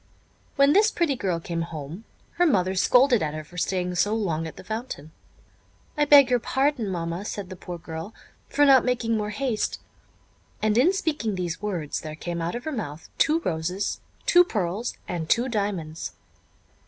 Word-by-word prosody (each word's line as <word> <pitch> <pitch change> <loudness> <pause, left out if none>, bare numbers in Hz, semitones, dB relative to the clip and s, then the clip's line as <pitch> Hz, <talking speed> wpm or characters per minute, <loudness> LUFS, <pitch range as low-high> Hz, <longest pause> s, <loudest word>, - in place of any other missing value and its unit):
When 280 +1 +5
this 425 +4 +5
pretty 335 -9 0
girl 185 -8 -1
came 170 0 -3
home, 165 +4 -7 0.3
her 355 - +4
mother 190 - +2
scolded 245 +6 +4
at 150 -1 -2
her 155 - -5
for 175 +4 -8
staying 180 +1 -1
so 205 +5 +1
long 165 -7 -1
at 160 - -9
the - - -11
fountain. 220 - -6 0.8
"I 295 - +2
beg 285 -2 +8
your 245 - +4
pardon, 265 -3 0
mamma," 170 0 -3
said 205 -2 -5
the - - -6
poor 175 0 -7
girl, 160 +4 -7 0.4
"for 290 - +4
not 270 -2 +7
making 245 -2 0
more 210 -1 -1
haste," 230 0 -2 0.8
and, 215 0 +1
in 265 +10 +5
speaking 305 - -1
these 175 -1 -3
words, 180 -8 -3
there 155 -1 -7
came 170 +1 -4
out 170 +4 -2
of 240 - -5
her 315 - -3
mouth 165 - -6
two 320 +1 +3
roses, 180 - -2 0.2
two 355 0 +7
pearls, 210 - -2
and 165 -2 -4
two 240 +2 +3
diamonds. 200 -9 -3
205 Hz, 180 wpm, -25 LUFS, 170-250 Hz, 0.8 s, beg